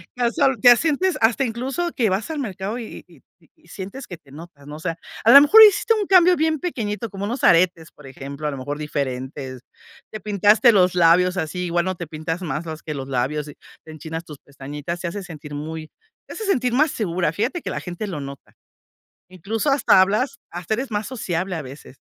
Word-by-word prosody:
que 250 - -7
el 235 - 0
sol 270 -3 +2
te 245 -1 +8
sientes 330 +6 0
hasta 240 +4 +2
incluso 265 +9 -3
que 225 -5 +1
vas 195 +9 -2
al 310 - -4
mercado 205 -3 -4
y 235 -3 -8
y - - -20 0.2
y - - -27
y - - -27
sientes 200 +8 -8
que 175 - -8
te 135 - -22
notas, 145 -2 -13
¿no? 150 - -8
O 155 - -9
sea, 165 0 -4 0.3
a 230 - +6
la 280 - +11
mejor 430 +10 +8
hiciste 430 +2 +5
un 420 -2 -1
cambio 365 -1 +5
bien 315 -1 0
pequeñito, 225 - -4
como 195 +1 -7
unos 235 +6 -2
aretes, 170 -1 +3
por 145 -2 -15
ejemplo, 140 +3 -8
a - - -1
lo 140 - -6
mejor 145 +3 -5
diferentes. 130 -3 -5 0.5
Te 215 - -6
pintaste 210 +4 +4
los 180 -2 +3
labios 180 +2 +4
así, 170 +2 -3
igual 175 +1 0
no 185 -1 -2
te 170 -2 -7
pintas 160 +3 -5
más 155 -1 -4
más 160 -1 -7
que 155 - -5
los 135 -1 -6
labios, 140 +4 -2
y 145 - -11 0.3
te 160 - -11
enchinas 160 +2 -7
tus 150 -3 -11
pestañitas, 145 +4 -7
se 175 - -4
hace 195 +3 -5
sentir 150 -4 -9
muy, 155 +1 -6 0.4
te - - -9
hace 445 - -6
sentir 250 -10 0
más 300 +3 +3
segura. 175 -6 -1
Fíjate 235 - -2
que - - -5
la - - -3
gente 180 +4 -6
lo 175 -7 -5
nota. 140 0 -10 0.8
Incluso 215 - -2
hasta 275 -8 +4
hablas 230 +9 +1
hasta 175 +5 -3
eres 260 +2 -5
más 210 0 -2
sociable 185 -7 -3
a 160 - -4
veces. 135 0 -12
180 Hz, 220 wpm, -22 LUFS, 155-235 Hz, 0.8 s, la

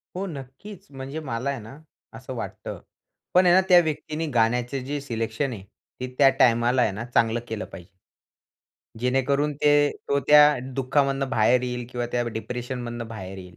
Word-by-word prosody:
हो, 195 +2 -3
नक्कीच 145 +7 -10
म्हणजे 135 +3 -6
मला 130 -2 -3
आहे 135 -3 -3
ना, 115 +7 -11 0.4
असं - - -8
वाटतं, - - -6 0.5
पण 180 +1 +5
आहे 175 - +6
ना 190 - +6
त्या 180 -1 +8
व्यक्तीने 155 +1 -3
गाण्याचे 120 +3 +1
जे 145 +1 -3
सिलेक्शन 115 +1 -3
आहे, 95 -4 -9 0.4
ते 130 - -3
त्या 135 -1 +7
टाईमाला 120 +1 +4
आहे 110 - +2
ना, 110 +4 -6
चांगलं 120 -1 +1
केलं 110 -1 -4
पाहिजे 90 0 -11 1.1
जेणेकरून 135 +4 +1
ते 145 0 +5 0.2
तो 140 - +2
त्या 150 0 +9 0.3
दुःखामधनं 135 0 +1
बाहेर 120 +3 +3
येईल 125 -1 -4
किंवा 120 -1 -3
त्या 120 0 +1
डिप्रेशनमधनं 120 0 -5
बाहेर 95 -4 -8
येईल. 90 -1 -12
125 Hz, 165 wpm, -25 LUFS, 115-145 Hz, 1.1 s, त्या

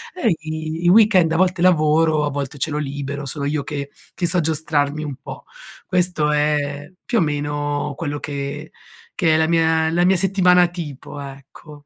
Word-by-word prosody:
Eh, 230 - +1
i 155 +1 -5
i - - +5
weekend, 190 -4 +5
a 165 - +1
volte 180 -1 +1
lavoro, 155 -3 +3
a - - -1
volte 140 0 -4
ce 155 - -2
l'ho 150 - -2
libero, 140 0 -4
sono 140 +1 -4
io 145 0 -1
che 140 -1 -5 0.2
che 175 - -1
so 180 - +1
giostrarmi 155 -1 -1
un 145 -2 -5
po'. - - -10 0.4
Questo 180 -5 +1
è, 145 -1 -1
più 235 - +1
o - - +2
meno, 145 -1 -2
quello 145 -3 -3
che 145 +1 -5 0.4
che 165 -5 +2
è - - +4
la 160 0 +2
mia 160 -1 +2
la 175 +2 +2
mia 190 +1 +4
settimana 180 -1 +4
tipo, 150 -5 -8
ecco. 140 +2 -12
155 Hz, 180 wpm, -20 LUFS, 145-170 Hz, 0.4 s, i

